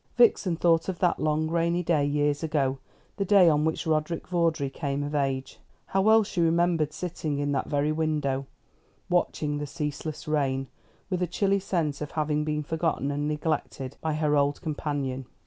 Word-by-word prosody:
Vixen 215 -7 +4
thought 165 +1 +2
of 185 - -3
that 175 0 +1
long 155 0 +1
rainy 170 +2 +1
day, 160 -4 +2
years 145 0 +1
ago, 140 -4 0 0.4
the 200 - +1
day 195 -2 +6
on 150 -2 +4
which 160 - -1
Roderick 160 +1 -1
Vawdrey 165 -5 0
came 140 0 -2
of 145 +1 -4
age. 135 -2 -1 0.3
How 195 - +1
well 220 +2 +6
she 185 -3 -2
remembered 165 -2 +2
sitting 160 -4 -3
in 145 0 -1
that 140 - -1
very 145 0 +1
window, 150 -4 -1 0.6
watching 150 -4 0
the 145 - -4
ceaseless 150 +2 -5
rain, 135 -3 0 0.5
with 180 -1 0
a 180 - +1
chilly 195 +3 +1
sense 165 -7 -1
of 150 - -5
having 150 -1 0
been 150 0 -1
forgotten 160 -2 -1
and 145 +1 -1
neglected 150 -3 -2
by 160 -1 -1
her 150 -1 +1
old 145 0 +2
companion. 145 -5 -3
155 Hz, 175 wpm, -27 LUFS, 145-170 Hz, 0.6 s, day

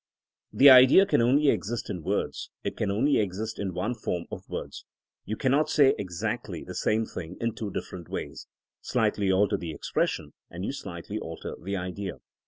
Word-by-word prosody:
The 140 0 +8
idea 130 +9 +8
can - - +2
only 140 +5 +4
exist 115 0 -1
in 90 - -4
words, - - -2
it - - -3
can 105 - -1
only 130 +9 +2
exist 110 +2 -3
in 100 -2 -2
one 105 +7 -1
form 90 -7 -3
of - - -8
words. - - -6 0.4
You 110 - -3
cannot 145 +4 +2
say 140 -3 +5
exactly 90 -4 -4
the - - -8
same 110 +1 +1
thing 90 -3 -8
in 115 -1 -1
two 110 - -5
different 90 -2 -6
ways. 70 -2 -6 0.3
Slightly 100 -2 +1
alter 100 +1 +3
the 85 0 -6
expression, - - -2 0.2
and 90 +3 -6
you - - -1
slightly 100 -3 -6
alter 80 -4 -6
the 100 +2 -3
idea. 90 +1 -4
105 Hz, 180 wpm, -27 LUFS, 90-125 Hz, 0.4 s, The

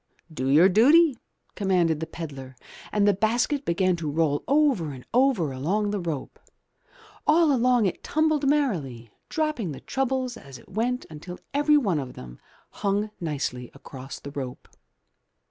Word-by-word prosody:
Do 130 -3 -3
your 155 +7 +7
duty," 265 - +5 0.3
commanded 180 -6 +1
the 160 - -4
pedlar, 140 -6 -8 0.4
and 205 -1 +2
the 205 - +5
basket 235 +8 0
began 185 +2 +2
to 160 -3 -3
roll 145 -1 0
over 275 - +2
and 130 -2 -11
over 245 - +3
along 200 +11 -1
the 205 - -1
rope. 165 -6 -5 0.9
All 315 -1 +5
along 245 -2 +3
it 185 - -2
tumbled 310 -2 +1
merrily, 150 - -1 0.2
dropping 305 - -1
the - - -9
troubles 260 -2 -2
as 135 -2 -11
it - - -18
went 245 +5 -1
until 175 +4 -8 0.2
everyone 285 - +3
of 130 -2 -6
them - - -11 0.3
hung 205 +1 -1
nicely 140 -6 -3
across 135 0 -9
the 140 - -9
rope. 130 -3 -6
190 Hz, 145 wpm, -25 LUFS, -, 0.9 s, your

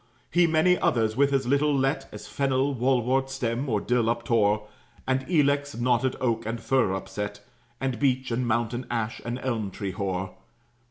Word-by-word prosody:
He 175 0 +4
many 165 +3 +3
others, 110 -2 +1
with 140 +2 +3
as 135 -2 +1
little 140 +2 +2
let 135 +3 0
As - - -9
fennel, 135 0 0
wall 125 0 +2
wort 135 +2 +1
stem, 130 0 -2
or 105 -3 +1
dill 125 +1 +1
uptore; 115 -3 +1 0.4
And 130 0 0
ilex, 145 -3 +2
knotted 125 +1 +1
oak, 115 -3 0
and 115 +2 -3
fir 115 -5 +1
upset, 105 +1 -5 0.4
And 130 -2 -2
beech 130 -2 +1
and 120 +1 0
mountain 120 +2 -1
ash, 115 -2 -2
and 120 +1 -3
elm 115 -6 -1
tree 95 0 -5
hoar. 95 -1 -3
125 Hz, 170 wpm, -26 LUFS, 115-135 Hz, 0.4 s, He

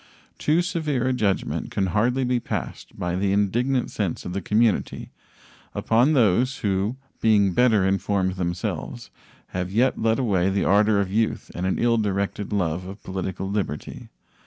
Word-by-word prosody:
Too 160 +4 +2
severe 150 -7 -1
a 130 - +2
judgment 105 -6 -1
can 100 - 0
hardly 125 +5 +2
be 125 -1 +1
passed - - -6
by 90 -1 -2
the 95 +1 0
indignant 120 +6 +1
sense 100 -6 -3
of 90 - -4
the 100 - -2
community 110 +2 0 0.6
upon 120 +7 +3
those 125 +1 +3
who, 100 +4 0 0.3
being 105 -4 +4
better 110 -3 +4
informed 95 -1 0
themselves, 85 -8 -4 0.4
have 90 0 -3
yet 120 +6 +2
led 110 0 +2
away 95 -8 +1
the 95 0 0
ardor 105 +1 +4
of 95 -2 -1
youth 110 +1 -1
and 90 +2 -2
an 95 - 0
ill 115 -1 +2
directed 100 0 -2
love 90 -3 -1
of 100 +2 -10
political 95 0 -4
liberty. 95 -7 -4
100 Hz, 160 wpm, -24 LUFS, 95-120 Hz, 0.6 s, being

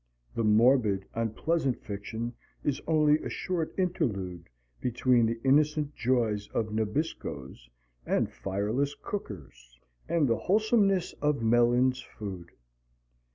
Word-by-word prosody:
The 115 - -1
morbid, 105 -2 +4
unpleasant 125 +5 0
fiction 110 +4 -5 0.3
is 145 -1 -1
only 155 -1 +4
a - - -5
short 170 -4 -2
interlude 100 - -2 0.3
between 125 -1 +2
the 115 0 -2
innocent 150 +2 +2
joys 115 -6 0
of 110 -1 -1
Nabiscos 105 - -3 0.3
and - - 0
fireless 110 +9 -1
cookers, - - -8 0.3
and 165 -4 +2
the 115 -2 +2
wholesomeness 200 -2 +2
of 150 -4 +1
Mellin's 120 +3 +3
Food. 95 -7 -8
120 Hz, 110 wpm, -29 LUFS, 105-150 Hz, 0.3 s, morbid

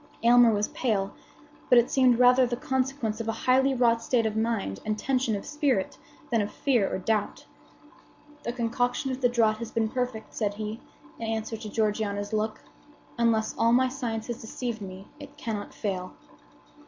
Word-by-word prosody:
Aylmer 240 0 +7
was 210 -1 0
pale; 205 -5 -1 0.6
but 250 - +7
it 240 0 +4
seemed 255 -3 +4
rather 250 +1 +6
the 240 - -2
consequence 255 -4 -1
of 225 - -6
a - - +1
highly 265 +1 +4
wrought 235 -2 +3
state 230 -1 +1
of 215 -1 -1
mind 220 - -1
and 215 0 -1
tension 255 -2 0
of 200 - -5
spirit 285 -9 0 0.4
than 230 -2 +3
of 205 - -3
fear 240 -8 +1
or - - -1
doubt. 210 +2 -1 1.0
"The 235 - -3
concoction 245 +2 -1
of 260 +1 -5
the 245 - +4
draught 220 -3 +2
has 235 - -5
been 225 -1 0
perfect," 250 -2 -3
said 205 -2 -1
he, 215 +1 -5 0.4
in 230 - -4
answer 225 0 -2
to 215 -1 -7
Georgiana's 205 -1 -1
look. 215 0 -1 0.6
"Unless 230 -2 +2
all 230 +1 +4
my 255 +1 +4
science 235 -4 -4
have 240 -2 -5
deceived 230 0 -5
me, 190 0 -8
it 285 0 -12
cannot 215 -3 -4
fail." 185 -3 -4
230 Hz, 180 wpm, -27 LUFS, 215-250 Hz, 1.0 s, Aylmer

